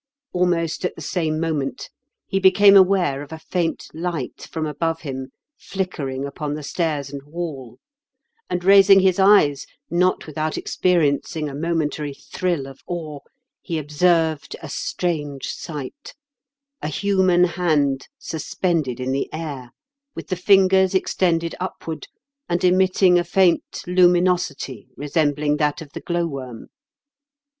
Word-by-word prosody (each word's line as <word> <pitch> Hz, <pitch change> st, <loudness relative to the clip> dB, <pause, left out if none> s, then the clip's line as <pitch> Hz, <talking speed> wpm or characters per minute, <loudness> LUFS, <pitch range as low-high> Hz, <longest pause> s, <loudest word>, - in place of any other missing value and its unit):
Almost 175 Hz, -2 st, 0 dB
at 180 Hz, -, -2 dB
the -, -, -10 dB
same 155 Hz, -3 st, -1 dB
moment 155 Hz, -4 st, -3 dB, 0.3 s
he 195 Hz, -, -1 dB
became 195 Hz, +1 st, +6 dB
aware 185 Hz, -7 st, +4 dB
of 145 Hz, -, -10 dB
a 160 Hz, -, -6 dB
faint 165 Hz, +1 st, -2 dB
light 165 Hz, -5 st, -4 dB
from 160 Hz, -1 st, -2 dB
above 165 Hz, +2 st, -2 dB
him 130 Hz, -3 st, -6 dB, 0.3 s
flickering 140 Hz, -9 st, -4 dB
upon 145 Hz, +1 st, -4 dB
the 150 Hz, -, -7 dB
stairs 150 Hz, -3 st, -2 dB
and 140 Hz, -, -5 dB
wall; 145 Hz, -5 st, -7 dB, 0.7 s
and, 175 Hz, 0 st, -2 dB
raising 195 Hz, 0 st, +7 dB
his 190 Hz, 0 st, +2 dB
eyes, 190 Hz, -8 st, +4 dB, 0.2 s
not 180 Hz, +2 st, +1 dB
without 155 Hz, 0 st, -3 dB
experiencing 160 Hz, -2 st, 0 dB
a 140 Hz, -, -6 dB
momentary 150 Hz, -2 st, -2 dB
thrill 175 Hz, -4 st, -3 dB
of 135 Hz, 0 st, -11 dB
awe, 160 Hz, -4 st, -5 dB, 0.4 s
he 170 Hz, -3 st, -3 dB
observed 160 Hz, +1 st, +1 dB
a 160 Hz, -, -7 dB
strange 150 Hz, -4 st, -3 dB
sight 155 Hz, -, -7 dB, 0.3 s
— 280 Hz, +1 st, -62 dB
a -, -, -3 dB
human 185 Hz, +1 st, +2 dB
hand, 155 Hz, -6 st, +1 dB
suspended 160 Hz, -, -2 dB
in 130 Hz, +1 st, -2 dB
the 135 Hz, +1 st, -2 dB
air, 145 Hz, -6 st, -6 dB, 0.5 s
with -, -, -8 dB
the 185 Hz, -, 0 dB
fingers 190 Hz, 0 st, +4 dB
extended 170 Hz, -3 st, +1 dB
upward, 170 Hz, -3 st, -5 dB, 0.4 s
and 175 Hz, +1 st, 0 dB
emitting 185 Hz, 0 st, +4 dB
a -, -, 0 dB
faint 175 Hz, 0 st, +1 dB
lumi 180 Hz, 0 st, +5 dB
nosity, 165 Hz, -, -2 dB
resembling 145 Hz, 0 st, 0 dB
that 150 Hz, -1 st, 0 dB
of 150 Hz, -3 st, -10 dB
the -, -, -6 dB
glow 175 Hz, -1 st, -1 dB
worm. 130 Hz, -7 st, -7 dB
165 Hz, 135 wpm, -22 LUFS, 145-180 Hz, 0.7 s, raising